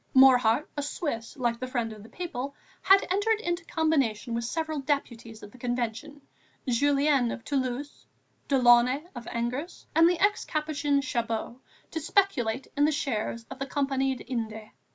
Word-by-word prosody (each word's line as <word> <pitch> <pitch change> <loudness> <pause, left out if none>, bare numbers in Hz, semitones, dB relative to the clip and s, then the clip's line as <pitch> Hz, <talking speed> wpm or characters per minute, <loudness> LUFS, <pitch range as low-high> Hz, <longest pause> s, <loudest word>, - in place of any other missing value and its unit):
Morhardt, 260 0 +6
a 290 - -1
Swiss 285 -6 -4
like 240 -2 0
the 255 - -4
Friend 235 -3 -2
of 215 - -12
the 220 - -13
People, 280 -6 -5 0.3
had 390 +1 +6
entered 420 +3 +2
into 345 -3 -2
a 335 - -26
combination 270 -8 0
with 235 0 -1
several 315 +3 -2
deputies 235 -6 -3
of 205 - -10
the 255 - -16
Convention, 245 +4 -3 0.5
Julien 280 0 +3
(of 230 - -6
Toulouse), 270 0 -3 0.4
Delaunay 250 +1 +5
(of 240 -3 -8
Angers) 250 +9 -4
and 330 +1 +6
the 355 -1 0
ex 405 +2 +2
Capuchin 295 -2 0
Chabot, 235 -2 -2 0.3
to 320 - -2
speculate 280 - +1
in 290 0 +4
the 305 - +3
shares 230 -5 -2
of - - -8
the 275 - -3
Compagnie 270 -2 0
des - - -10
Indes. 220 -3 -5
265 Hz, 165 wpm, -28 LUFS, 235-300 Hz, 0.5 s, Morhardt